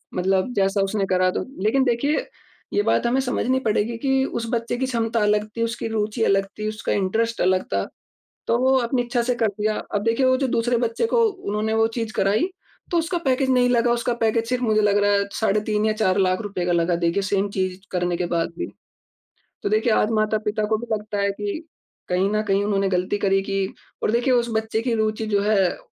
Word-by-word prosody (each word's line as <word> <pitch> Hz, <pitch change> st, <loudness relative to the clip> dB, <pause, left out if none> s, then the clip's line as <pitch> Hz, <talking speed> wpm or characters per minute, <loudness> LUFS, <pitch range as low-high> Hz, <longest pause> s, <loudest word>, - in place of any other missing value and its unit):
मतलब 190 Hz, +5 st, +1 dB
जैसा 195 Hz, 0 st, +2 dB
उसने 195 Hz, 0 st, 0 dB
करा 185 Hz, -1 st, +2 dB
तो -, -, -3 dB, 0.2 s
लेकिन 255 Hz, +6 st, +3 dB
देखिए, 275 Hz, -, 0 dB, 0.5 s
ये 410 Hz, -, +3 dB
बात -, -, +1 dB
हमें 255 Hz, +3 st, +2 dB
समझनी 260 Hz, 0 st, 0 dB
पड़ेगी 220 Hz, +2 st, 0 dB
कि 265 Hz, +2 st, +1 dB
उस 230 Hz, -3 st, -3 dB
बच्चे 235 Hz, 0 st, -1 dB
की 260 Hz, -, 0 dB
क्षमता 230 Hz, -2 st, -1 dB
अलग 210 Hz, 0 st, +2 dB
थी, 230 Hz, -, +1 dB
उसकी 230 Hz, 0 st, -3 dB
रुचि 220 Hz, +1 st, -1 dB
अलग 195 Hz, 0 st, +3 dB
थी, 215 Hz, -, -2 dB
उसका 215 Hz, 0 st, -4 dB
इंटरेस्ट 225 Hz, +4 st, 0 dB
अलग 185 Hz, 0 st, +2 dB
था, 100 Hz, 0 st, 0 dB, 0.6 s
तो 230 Hz, -, +2 dB
वो 260 Hz, +1 st, +3 dB
अपनी 245 Hz, +1 st, 0 dB
इच्छा 240 Hz, 0 st, -1 dB
से 245 Hz, +1 st, 0 dB
कर 225 Hz, -2 st, +1 dB
दिया। 215 Hz, 0 st, +1 dB, 0.2 s
अब 205 Hz, -, +1 dB
देखिए 230 Hz, +4 st, +2 dB
वो 260 Hz, -, +4 dB
जो 270 Hz, +1 st, 0 dB
दूसरे 240 Hz, +1 st, +1 dB
बच्चे 230 Hz, -, 0 dB
को 485 Hz, -, +2 dB
उन्होंने 220 Hz, -, -3 dB
वो 225 Hz, 0 st, +3 dB
चीज 225 Hz, -2 st, -2 dB
कराई 200 Hz, -, +2 dB, 0.5 s
तो 345 Hz, -, +2 dB
उसका 345 Hz, +2 st, -1 dB
पैकेज 265 Hz, -4 st, +1 dB
नहीं 250 Hz, -1 st, +4 dB
लगा, 240 Hz, 0 st, +3 dB
उसका 240 Hz, +1 st, 0 dB
पैकेज 230 Hz, 0 st, 0 dB
सिर्फ 250 Hz, 0 st, -1 dB
मुझे 215 Hz, -3 st, +2 dB
लग 205 Hz, 0 st, +3 dB
रहा 205 Hz, -, +3 dB
है 200 Hz, 0 st, +2 dB
साढ़े 215 Hz, -1 st, +1 dB
₹3 210 Hz, 0 st, +1 dB
या 215 Hz, -, +2 dB
₹4 205 Hz, -3 st, +1 dB
लाख 185 Hz, -1 st, +2 dB
रुपए 195 Hz, -4 st, -3 dB
का 175 Hz, -, +1 dB
लगा 170 Hz, 0 st, +2 dB
देखिए 170 Hz, +3 st, 0 dB
सेम 200 Hz, 0 st, 0 dB
चीज 185 Hz, -1 st, -2 dB
करने 175 Hz, -1 st, -1 dB
के 175 Hz, 0 st, -1 dB
बाद 165 Hz, 0 st, 0 dB
भी। -, -, -2 dB, 1.0 s
तो -, -, 0 dB
देखिए 215 Hz, +2 st, +2 dB
आज 215 Hz, -, +2 dB
माता-पिता 215 Hz, 0 st, 0 dB
को -, -, +4 dB
भी 240 Hz, -, -7 dB
लगता 210 Hz, -1 st, -3 dB
है 200 Hz, -, +1 dB
कि 205 Hz, +6 st, -4 dB, 0.5 s
कहीं 185 Hz, +2 st, +1 dB
न 215 Hz, -, +1 dB
कहीं 195 Hz, +1 st, +2 dB
उन्होंने 195 Hz, -1 st, +1 dB
गलती 185 Hz, +2 st, 0 dB
करी 195 Hz, -1 st, +2 dB
कि 195 Hz, 0 st, -1 dB, 0.4 s
और -, -, +2 dB
देखिए 245 Hz, +2 st, +2 dB
उस 240 Hz, -1 st, +2 dB
बच्चे 220 Hz, 0 st, -1 dB
की 240 Hz, -2 st, 0 dB
रुचि 220 Hz, 0 st, -1 dB
जो 205 Hz, -1 st, +1 dB
है, 200 Hz, -4 st, +2 dB
215 Hz, 220 wpm, -23 LUFS, 195-235 Hz, 1.0 s, वो